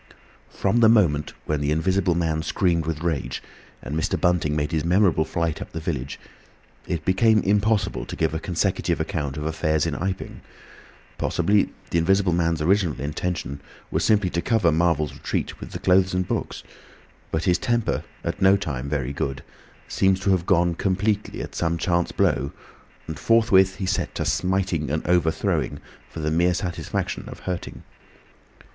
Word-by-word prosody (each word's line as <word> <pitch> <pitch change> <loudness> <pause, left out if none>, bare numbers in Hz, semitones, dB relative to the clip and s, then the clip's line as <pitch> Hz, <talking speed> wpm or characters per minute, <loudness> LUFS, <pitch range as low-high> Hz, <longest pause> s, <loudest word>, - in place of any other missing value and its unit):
From 100 +4 0
the 115 -2 +6
moment 85 -10 +3
when 75 -1 -1
the 70 - 0
Invisible 90 +3 +1
Man 80 -2 0
screamed 85 -1 0
with 80 0 -3
rage 80 -6 -2 0.4
and 70 - -4
Mr. 80 - 0
Bunting 90 -4 +1
made 75 0 -1
his 80 -3 0
memorable 90 -2 +3
flight 85 -2 -2
up - - -8
the 80 - -3
village, 70 -5 -4 0.7
it 80 -2 -3
became 110 +4 +4
impossible 105 +1 +1
to - - -6
give - - 0
a 80 - -2
consecutive 85 0 -1
account 70 -1 -3
of 75 - -4
affairs 80 -1 0
in 80 - -1
Iping. 95 +4 -4 0.8
Possibly 100 +4 +2 0.2
the 85 - +2
Invisible 95 +1 +2
Man's 85 -2 +1
original 90 -4 +2
intention 75 -1 -3 0.3
was - - 0
simply 105 -4 +3
to 85 - -1
cover 105 -7 +2
Marvel's 80 -2 +1
retreat - - -3
with - - -8
the - - -5
clothes 95 0 +3
and 90 -1 0
books. - - -3 0.7
But 80 0 -1
his 90 -2 +2
temper, 120 -3 0 0.2
at - - -3
no 95 +1 +6
time 70 -7 -4
very 70 -2 -2
good, 70 0 -3 0.4
seems 95 0 +2
to 100 0 +2
have 90 -2 +1
gone 85 -3 +3
completely 100 +4 -1
at - - -8
some 85 0 0
chance 85 0 0
blow, 70 +2 +1 0.5
and 80 -2 -6
forthwith 95 -3 +4
he 95 - -4
set 95 +2 -1
to - - -2
smiting 90 -5 0
and 75 +2 -2
overthrowing, 85 -2 +1 0.3
for 80 - -7
the 75 0 -1
mere 85 +2 +2
satisfaction 90 -1 -3
of - - -10
hurting. 90 -2 -5
85 Hz, 165 wpm, -24 LUFS, 80-95 Hz, 0.8 s, the